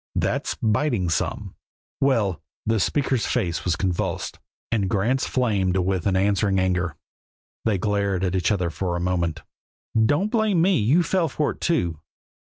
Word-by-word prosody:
That's - - 0
biting 110 - +1
some." - - -2 0.5
"Well!" 115 - +1 0.2
The 110 0 +1
speaker's 130 +1 +1
face 85 -2 -1
was 90 -2 +1
convulsed, 90 -1 -2 0.3
and 100 -5 +1
Grant's 115 +7 +1
flamed 100 -7 +1
with 95 -1 0
an 95 - +2
answering 100 +1 +2
anger. 90 -2 0 0.7
They 110 -3 +2
glared 100 -1 0
at 90 -1 0
each 95 +3 +1
other 90 -5 0
for 85 +2 -2
a - - -1
moment. 85 -2 -1 0.5
"Don't 145 - +2
blame 220 -6 +2
me. 180 0 +3
You 140 +12 +3
fell 175 -2 +1
for 150 +2 0
it, - - -12
too." 85 - 0
100 Hz, 155 wpm, -24 LUFS, 90-130 Hz, 0.7 s, me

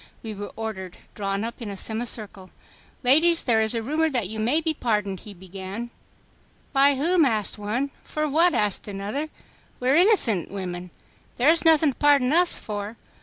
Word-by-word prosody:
We 220 -1 -5
were 205 0 -7
ordered 200 -5 -6 0.2
drawn 200 0 -3
up 235 +2 -6
in 225 - -5
a 200 - -6
semi 220 +4 -3
circle. 205 -5 -7 0.5
"Ladies, 320 +7 +4
there 225 -3 +3
is 220 +2 -1
a 230 - -2
rumor 310 +6 0
that 245 -9 -1
you 220 +2 -6
may 245 +9 +2
be 320 0 -1
pardoned," 210 -8 -1
he 210 - -10
began. 190 +5 -7 0.8
"By 280 +1 +5
whom?" 330 +5 +2
asked 220 -6 0
one. 240 +7 -2
"For 305 0 -2
what?" 330 +5 +3
asked 210 -1 0
another. 205 +10 -4 0.5
"We 250 - -1
are 270 - +4
innocent 335 - +4
women. 180 -2 -6 0.5
There 255 +5 +4
is 330 0 +4
nothing 320 -2 +5
to - - -31
pardon 285 -2 +4
us 350 +1 +3
for." 210 +1 -6
230 Hz, 180 wpm, -24 LUFS, 205-290 Hz, 0.8 s, By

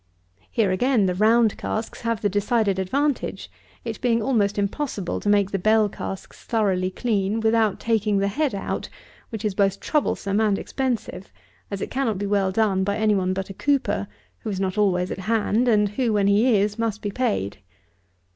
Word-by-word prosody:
Here 215 -5 +1
again 230 +2 +2
the 180 - +1
round 220 +3 +3
casks 220 +1 -4
have 230 -2 -2
the - - +4
decided 205 0 +1
advantage; 280 +10 -1 0.3
it 225 -2 -5
being 235 -2 +2
almost 210 -4 +1
impossible 200 -1 -2
to 205 - -2
make 205 -1 +3
the 195 - -1
bell 215 +2 +3
casks 195 0 -7
thoroughly 195 -5 0
clean, 210 0 -1
without 220 -2 +2
taking 215 -3 +1
the 200 0 +1
head 275 +3 -1
out, 195 - -4 0.4
which 220 -2 -5
is 210 - 0
both 195 0 +1
troublesome 215 -8 0
and 210 -3 +2
expensive; 235 -9 -3 0.4
as 200 -1 -5
it - - -4
cannot 255 -6 0
be 205 - -3
well 200 -2 +1
done 195 -2 +1
by 200 +1 -1
any 215 -1 +2
one 185 -2 +1
but 195 +1 -4
a - - -7
cooper, 265 - 0 0.3
who - - -5
is 195 -2 -3
not 190 -1 -1
always 185 -4 +1
at - - -4
hand, 225 +4 +1
and 210 -3 +3
who, 230 +2 0
when 205 -1 +2
he 215 +4 +4
is, 205 +2 0
must 220 -2 -2
be 205 - -2
paid. 200 - -1
210 Hz, 185 wpm, -23 LUFS, 195-230 Hz, 0.4 s, the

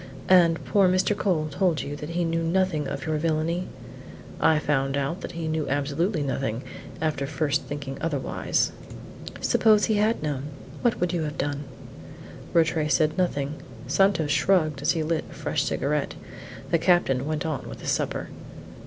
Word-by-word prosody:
"And 170 -3 +5
poor 195 -3 +4
Mr. 185 +3 +2
Cole 175 -7 0
told 170 +1 +1
you 145 - -5
that 150 +1 -7
he 175 +1 -1
knew 165 0 0
nothing 165 -3 +1
of - - -4
your 155 -1 0
villany?" 165 +3 0 0.7
"I 160 - +4
found 135 -2 0
out 140 +7 -2
that - - -6
he 165 -1 -4
knew 155 -1 -1
absolutely 145 +5 0
nothing 130 -3 -2 0.4
after 150 -4 -1
first 155 0 0
thinking 145 -2 -6
otherwise." 145 -5 0 0.7
"Suppose 215 -2 +4
he 215 - +1
had 215 -3 +1
known? 145 -3 -2 0.4
What 240 - +1
would 180 0 0
you 170 - 0
have 150 -1 -4
done?" 145 +1 -2 0.9
Rattray 160 -2 +2
said 155 0 +2
nothing. 150 -5 -1 0.2
Santos 160 +1 +2
shrugged 155 -2 +2
as - - +2
he 165 -2 -1
lit 160 0 -1
a - - -11
fresh - - -1
cigarette. - - -1 0.6
The 170 - +4
captain 155 -7 +2
went 155 -1 -2
on 155 -3 -3
with - - -9
his - - -1
supper. - - -2
155 Hz, 165 wpm, -26 LUFS, 145-175 Hz, 0.9 s, And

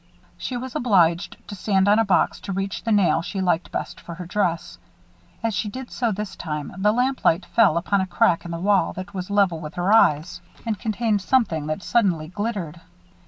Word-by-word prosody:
She 250 - -4
was 255 0 -7
obliged 180 -6 +2
to - - -7
stand 195 -1 +1
on 210 +2 +5
a - - +4
box 195 -4 +1
to - - -6
reach 195 0 -3
the 230 - -1
nail 205 -4 +3
she 195 +3 -5
liked 175 -2 0
best - - -5
for 170 - -8
her 180 0 -7
dress. 170 - -2 0.6
As 225 -1 0
she 210 +2 -2
did 255 +4 -8
so 235 -2 0
this 205 -1 -5
time, 150 -3 -5
the 200 +3 +2
lamplight 245 -7 +1
fell 205 -8 +3
upon 195 +3 +1
a 190 - -2
crack 175 -1 +2
in 175 - -8
the 170 - -4
wall 190 -1 +2
that 185 +2 -8
was 185 -1 -5
level 200 -5 +2
with 155 0 -8
her 180 +4 +1
eyes, 170 -5 +3 0.2
and 220 -4 -2
contained 215 -1 0
something 190 - +1
that 155 +5 -3
suddenly 180 -9 +1
glittered. 185 -5 -4
195 Hz, 205 wpm, -23 LUFS, 170-210 Hz, 0.6 s, on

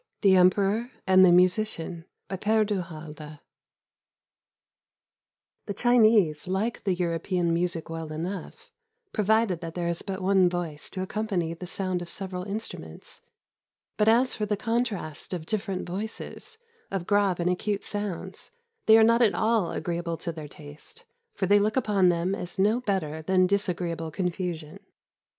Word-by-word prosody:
THE 195 -3 +6
EMPEROR 195 +5 +3 0.2
AND 185 0 +6
THE 185 - +7
MUSICIAN 180 -2 +2 0.2
BY 190 - -4
PkRE 215 +3 +2
DU 205 -3 -1
HALDE 155 -2 -9 2.3
The 200 - -2
Chinese 215 -11 +4
like 200 +6 -2
the 190 -2 +2
European 170 0 0
music 170 -1 -1
well 165 -1 -6
enough, 175 +4 -6 0.4
pro 215 - 0
vided 215 -3 +2
that 165 -1 -7
there 175 -1 -2
is 170 0 -2
but 190 -1 -5
one 190 -1 +4
voice 170 -4 -4
to 185 - -4
accompany 190 -5 -2
the 180 +2 -8
sound 185 -1 -2
of 175 - -6
several 185 0 -4
instnmients. 210 +3 -7 0.7
But 210 - +1
as 240 +3 +4
for 210 -2 -2
the 210 0 0
contrast 220 -9 -2
of 160 -3 -6
different 195 -2 -3
voices, 215 - -5 0.3
of 190 -3 -3
grave 200 -3 +2
and 170 - 0
acute 200 +3 -1
sounds, 205 -4 -4 0.4
they 220 0 +9
are 225 - +7
not 230 +2 +4
at 225 -4 +4
all 220 -5 +2
agreeable 170 0 -3
to 170 - -4
their 155 -2 -8
taste, 145 - -13 0.3
for 190 - 0
they 205 +2 +5
look 215 +3 +1
upon 200 -7 +3
them 175 +2 0
as 180 -2 -6
no 210 +6 +2
better 165 -9 -2
than 185 +3 +3
disagreeable 175 -4 -1
confusion. 170 -2 -4
185 Hz, 155 wpm, -27 LUFS, 170-210 Hz, 2.3 s, they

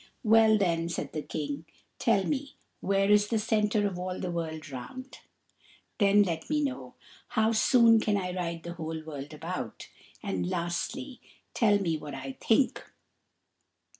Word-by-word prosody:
"Well, 220 -1 +6
then," 170 -4 +1
said 170 - -4
the 155 - -2
King, 145 +1 -4 0.3
"tell 205 -4 +3
me 275 +3 -3 0.2
where 195 +1 +2
is 210 0 +5
the 225 - 0
centre 210 -1 +1
of 190 -3 -2
all 185 0 -4
the 180 - -3
world 160 -2 -4
round; 255 - -8 0.8
then 205 0 +5
let 165 -4 -3
me 300 -1 +1
know 275 -2 -4 0.3
how 220 +1 +2
soon 230 0 +5
can 210 -1 +1
I 180 -2 -3
ride 170 -2 -3
the 170 - -6
whole 160 -1 -5
world 145 -2 -7
about; 155 -6 -6 0.3
and, 90 -2 -2
lastly, 240 +10 -3 0.3
tell 210 -3 +4
me 165 -6 -1
what 145 -2 -7
I 135 0 -5
think." 240 +4 +2
185 Hz, 155 wpm, -29 LUFS, 160-220 Hz, 0.8 s, Well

